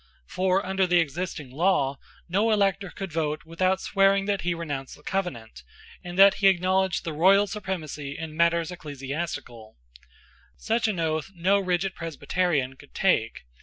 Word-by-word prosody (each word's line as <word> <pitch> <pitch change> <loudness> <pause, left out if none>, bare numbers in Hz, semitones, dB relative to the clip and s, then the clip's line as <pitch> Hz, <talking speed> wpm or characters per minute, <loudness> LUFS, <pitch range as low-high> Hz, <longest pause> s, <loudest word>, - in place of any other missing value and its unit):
For 185 - 0
under 190 0 +1
the 175 0 +4
existing 160 -3 -3
law 145 -3 +1 0.3
no 200 +6 +1
elector 200 -2 +1
could 195 -3 -7
vote 155 -1 -1
without 185 +3 0
swearing 195 0 +3
that 200 -1 -1
he 175 0 -1
renounced 145 -5 -5
the 150 - -20
Covenant, 120 - -4 0.4
and 175 0 -7
that 195 0 +8
he 195 - +6
acknowledged 190 0 +2
the 165 - -4
Royal 195 +6 +5
supremacy 160 -9 -5
in 160 -1 -6
matters 170 +1 +2
ecclesiastical, 140 -7 -6 0.8
Such 225 +1 0
an 205 -5 -2
oath 160 0 -1
no 190 +4 +2
rigid 185 0 -1
Presbyterian 160 -4 -1
could - - -18
take. - - +1
175 Hz, 150 wpm, -26 LUFS, 155-190 Hz, 0.8 s, that